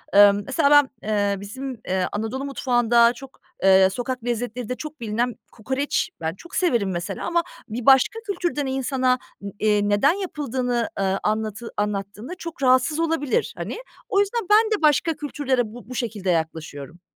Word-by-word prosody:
ııı, 205 0 +9
mesela 270 +1 +2
ben, 290 -2 +6 0.2
ııı, 200 -1 0
bizim, 210 +7 -8 0.3
ııı, 185 -1 +1
Anadolu 225 +6 -3
mutfağında 240 -3 +3
çok, 270 +2 -13 0.3
ııı, 190 0 +7
sokak 245 +3 -4
lezzetlerinde 245 0 -3
çok 305 +1 -8
bilinen 230 +2 -1 0.2
kokoreç. 265 +5 -2
Ben 160 +2 -2
çok 340 - -12
severim 235 - +1
mesela 175 -1 -4
ama 340 0 +1 0.3
bir 230 +2 -5
başka 270 - +5
kültürden 345 -7 -1
insana, 260 -1 0 0.4
iii, 210 -1 +2
neden 205 +11 +4
yapıldığını, 260 - -2
ııı, 195 0 +1
anlatı 215 +2 -2
anlattığında 210 - -3
çok 320 -5 -7
rahatsız 260 +5 +3
olabilir, 325 - 0
hani. - - -5 0.3
O 400 - +2
yüzden 405 0 0
ben 435 +1 +5
de - - -14
başka 310 +1 +3
kültürlere 285 -4 -1
bu 245 -1 -12
bu 255 - -6
şekilde 215 -6 -3
yaklaşıyorum. 160 -1 -3
245 Hz, 155 wpm, -23 LUFS, 210-285 Hz, 0.4 s, ııı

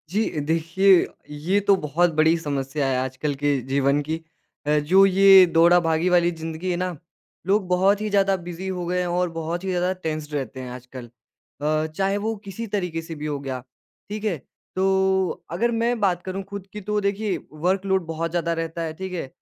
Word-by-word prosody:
जी, 210 +5 0
देखिए 165 +5 +3 0.2
ये 155 +7 0
तो 200 - +7
बहुत 165 +1 +1
बड़ी 160 +2 +4
समस्या 140 -2 -2
है 130 -1 +1
आजकल 130 +3 -2
के 145 0 +1
जीवन 140 +1 +2
की 160 +3 -4 0.4
अ, 150 0 +3
जो 185 +7 +5
ये 195 0 +7
दौड़ा-भागी 165 0 +4
वाली 175 -1 +4
ज़िंदगी 165 +2 -5
है - - 0
ना, 180 -2 -3 0.5
लोग 195 -1 +2
बहुत 190 +3 +3
ही 215 - -1
ज़्यादा 195 -1 +3
बिज़ी 175 +1 -7
हो 180 -2 -3
गए 180 +1 0
हैं 180 - -1
और 175 +1 0
बहुत 165 +2 -3
ही 190 - -3
ज़्यादा 180 0 +1
टेंस्ड 155 -1 -4
रहते 135 -3 -4
हैं 130 -1 -6
आजकल। 125 0 -9 0.6
अ, 155 +1 +1
चाहे 195 +5 -1
वो 220 +2 -2
किसी 200 +4 -6
तरीक़े 180 -4 -2
से 165 0 -8
भी 150 0 -6
हो 145 -2 -2
गया। 135 -2 -4 0.5
ठीक 210 0 -5
है? 195 -6 0 0.4
तो 190 -1 +1
अगर 230 +8 +1
मैं 235 +1 0
बात 185 -4 +1
करूँ 190 +1 -4
खुद 200 -1 -7
की 210 - -6
तो 210 +2 -1
देखिए 200 0 -1
वर्क 180 +6 -1
लोड 190 -2 +1
बहुत 165 +1 -2
ज़्यादा 170 -1 0
रहता 165 0 -4
है, 160 -1 -4
ठीक 190 +3 -6
है? 170 -6 -3
175 Hz, 200 wpm, -23 LUFS, 155-190 Hz, 0.6 s, तो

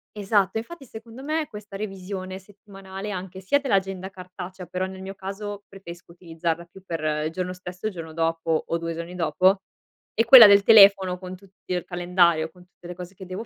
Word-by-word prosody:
Esatto, 200 0 +1
infatti 280 +6 -7
secondo 230 +2 -11
me 310 0 -1
questa 210 -2 -9
revisione 190 -2 -6
settimanale, 195 0 -10
anche 185 0 -6
sia 190 +10 +1
dell'agenda 195 -7 -1
cartacea, 185 0 -9
però 185 +2 -3
nel 190 0 -9
mio 195 +1 -7
caso 200 +1 -7
preferisco 175 -3 -12
utilizzarla 170 0 -4
più 185 +2 -17
per 165 -3 -4 0.3
il 160 - -5
giorno 180 +1 -4
stesso, 180 +2 -10
il 210 - -4
giorno 165 -2 -8
dopo 165 0 0
o 170 - -1
2 165 0 -4
giorni 170 +2 -7
dopo. 185 +4 +2 0.5
E 225 - +2
quella 230 -2 +11
del 200 0 +6
telefono, 195 -4 +7
con 185 0 -9
tutti 195 -1 -15
il 180 - -2
calendario, 175 -2 +2
con 180 +1 -19
tutte 175 -1 -16
le 180 - -6
cose 180 +1 -10
che 190 - -10
devo 185 +5 -6
190 Hz, 190 wpm, -24 LUFS, 175-200 Hz, 0.5 s, quella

